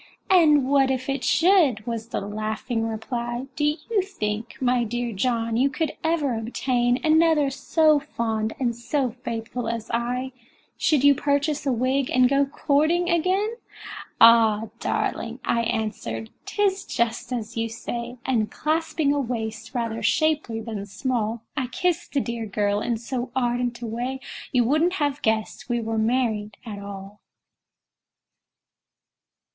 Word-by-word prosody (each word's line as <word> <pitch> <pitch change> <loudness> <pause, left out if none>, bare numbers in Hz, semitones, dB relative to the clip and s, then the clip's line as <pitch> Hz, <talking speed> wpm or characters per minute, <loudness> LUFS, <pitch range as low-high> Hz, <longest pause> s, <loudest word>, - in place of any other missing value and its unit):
"And 300 -7 +5
what 270 -1 +4
if 260 -1 -1
it 275 -1 -1
should?" 320 - +4
was 230 -1 -4
the - - -3
laughing 215 +3 -2
reply; 235 +2 -3
"Do 295 - 0 0.2
you 440 -4 +2
think, 225 - -4
my 250 -1 +2
dear 240 +1 -3
John, 230 +2 0
you 270 +3 +3
could 310 +2 -1
ever 320 -5 +1
obtain 245 +2 0
Another 315 -3 +4
so 310 +2 +3
fond 225 -6 -2
and 240 -3 0
so 255 +2 -1
faithful 235 -1 -5
as 230 -1 -4
I, 250 +2 -1 0.4
Should 300 -4 +2
you 285 0 +8
purchase 285 +1 0
a - - +3
wig, 255 +2 +1
and 255 0 +5
go 275 +1 +2
courting 315 +5 +1
again?" 380 +7 +1 0.6
"Ah! 225 -2 +6
darling," 235 +2 -2
I 235 - +2
answered, 215 - -3 0.2
"'tis 395 -2 +1
just 235 +1 -2
as 230 -2 -4
you 230 0 -1
say;" 235 +1 -5
And 225 -5 +1
clasping 315 -2 0
a 290 - 0
waist 225 -3 -4
rather 230 -2 -2
shapely 285 -1 +1
than 220 -3 -5
small, 230 0 -2
I 260 -4 -1
kissed 345 +7 -1
the 280 - +2
dear 235 -2 -4
girl 205 0 0
in 235 0 -1
so 245 +2 -4
ardent 245 -1 -1
a - - -2
way 245 +4 -3 0.3
You 250 -2 +3
wouldn't 310 +8 +2
have 290 -5 -1
guessed 220 +3 -1
we 240 0 +1
were 225 -1 -2
married 220 -3 0
at 210 -3 -6
all! 200 0 -9
245 Hz, 145 wpm, -24 LUFS, 225-285 Hz, 0.6 s, you